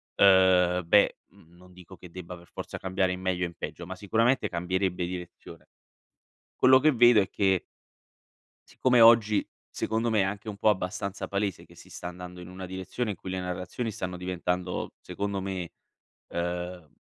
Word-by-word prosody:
uhm, 95 -2 +5
beh, 100 +3 +4
mhmm, 85 +2 -22
non 90 +1 -17
dico 90 +1 -13
che 90 - -13
debba 90 0 -8
per 85 0 -17
forza - - -7
cambiare 95 0 0
in 90 0 -5
meglio 90 -1 -1
o - - -2
in 85 - -11
peggio, 85 - -7
ma 95 +2 -7
sicuramente 115 +7 +1
cambierebbe 90 +1 -1
direzione. 90 -1 -9 0.9
Quello 130 0 +6
che 155 +3 +5
vedo 120 -3 +6
è 95 - -1
che 95 -2 +1 1.1
siccome 125 -2 +3
oggi 115 -2 +6 0.2
secondo 115 +1 -1
me 110 - +2
è - - +3
anche 100 +2 -5
un 105 -2 -5
po' 110 - +3
abbastanza 100 0 -2
palese 100 -2 -2
che - - -19
si - - -16
sta - - -10
andando 90 0 -9
in 90 - -9
una 95 0 -8
direzione 95 +5 -4
in 100 - -2
cui 90 +2 -8
le 95 - -2
narrazioni 90 +6 -4
stanno 90 -4 -5
diventando, 90 0 -3
secondo 100 +2 -3
me, 95 -3 -4 0.6
uhm, 90 -1 -4
95 Hz, 175 wpm, -28 LUFS, 90-100 Hz, 1.1 s, Quello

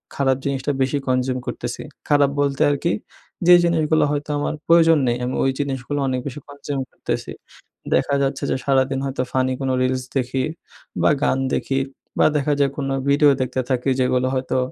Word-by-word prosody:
খারাপ 135 -2 +2
জিনিসটা 140 0 -1
বেশি 130 +2 +1
কনজিউম 130 0 +1
করতেছি। 120 -1 -4 0.3
খারাপ 145 -1 +4
বলতে 140 -1 0
আর - - +1
কি 170 - +2 0.5
যে 180 - +9
জিনিসগুলো 160 -2 +2
হয়তো 145 0 -3
আমার 145 - -1
প্রয়োজন 165 -1 +6
নেই 120 0 +1
আমি 125 - -2
ওই 135 - +2
জিনিসগুলো 140 0 -2
অনেক 130 -1 0
বেশি 140 +1 -6
কনজিউম 145 -1 -4
করতেছি। - - -4 0.6
দেখা 140 - +1
যাচ্ছে 135 +1 -2
যে - - +1
সারাদিন 135 -1 +2
হয়তো 135 -1 -2
ফানি 130 0 +1
কোনো 135 -1 0
রিলস 130 0 0
দেখি, 130 0 -1 0.6
বা - - +4
গান - - +2 0.2
দেখি 135 0 -1 0.4
বা - - +5
দেখা 145 +1 +1
যায় 140 -1 +2
কোনো 135 -2 -2 0.2
ভিডিও 145 +1 +5
দেখতে 130 0 -1
থাকি 130 0 0
যেগুলো 125 0 +2
হয়তো 130 0 -1
135 Hz, 175 wpm, -21 LUFS, 130-145 Hz, 0.6 s, যে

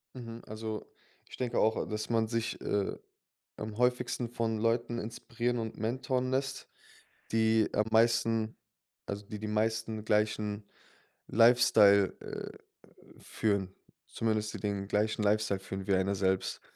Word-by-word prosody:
Mhm. 115 -2 -8
Also, 110 0 -5 0.4
ich - - -10
denke 125 -2 -1
auch, 110 +1 +3
a - - -1
dass 105 +1 -4
man 115 -1 +2
sich, 115 0 -2
äh, 100 -1 -1 0.6
am 110 0 -6
häufigsten 125 -1 +1
von 115 -2 -1
Leuten 115 +1 +1
inspirieren 120 +2 -3
und 110 -1 -5
mentoren 130 +3 -1
lässt, 135 0 -2 0.6
die 110 -1 +3
am 105 - +2
meisten 115 -1 +3 0.5
also 100 +1 -5
die 105 +1 -6
die 105 - -4
meisten 110 0 -1
gleichen 105 -1 0 0.7
Lifestyle, 110 -4 +6
äh, - - -7 0.6
führen 100 -3 -1 0.3
zumindest 110 -1 -1
die - - -5
den 100 -2 -2
gleichen 105 +1 0
Lifestyle 105 -1 +2
führen 95 0 -6
wie 100 - +3
einer 95 +1 +1
selbst. 95 0 0
110 Hz, 135 wpm, -31 LUFS, 105-115 Hz, 0.7 s, Lifestyle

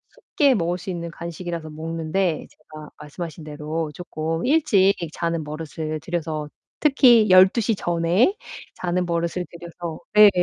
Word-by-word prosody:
쉽게 285 -6 +2
먹을 175 -3 0
수 185 +2 -8
있는 170 -2 -4
간식이라서 170 -1 -6
먹는데 160 +2 -2
제가 155 0 -13
말씀하신 160 +2 -8
대로 155 +1 -4
쪼끔 165 0 -4
일찍 240 -10 +4 0.2
자는 170 -1 -2
버릇을 155 +1 -5
들여서 155 -1 -3 0.3
특히 245 -7 +5
12:00 190 +5 +5
전에 175 - +2 0.4
자는 180 0 -1
버릇을 170 +1 -2
들여서 170 -1 -7
네. 210 0 +9
170 Hz, 275 characters per minute, -23 LUFS, 160-185 Hz, 0.4 s, 네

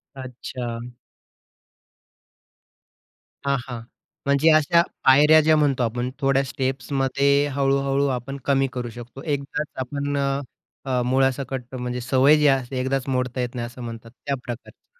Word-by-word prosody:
अच्छा. 125 -2 -6 2.7
हां, 140 0 +2
हां, 120 -3 -6 0.4
म्हणजे 140 +3 +4
अशा 155 +2 +5 0.2
पायऱ्या 150 +4 +7
ज्या 155 +1 +4
म्हणतो 140 -4 +2
आपण 120 +2 -1
थोड्या 135 -1 +2
स्टेप्स 130 +1 -3
मध्ये 140 +2 +3
हळू-हळू 140 0 +1
आपण 135 +3 -6
कमी 135 -1 +2
करू 125 -1 -4
शकतो. 120 +2 -10
एकदाच 145 0 -2 0.2
आपण 140 +2 -3
अ, 140 0 0 0.4
अ, 130 -2 0
मुळासकट 130 0 0
म्हणजे 125 0 -3
सवय 135 +4 +4
जी 150 0 +4
असते 135 -1 +1
एकदाच 130 +1 -1
मोडता 125 -1 -1
येत 125 0 -4
नाही 120 -1 -3
असं 120 +1 -11
म्हणतात 115 -1 -8
त्या 140 +3 -4
प्रकारच्या. 125 - -10
135 Hz, 135 wpm, -23 LUFS, 125-140 Hz, 2.7 s, पायऱ्या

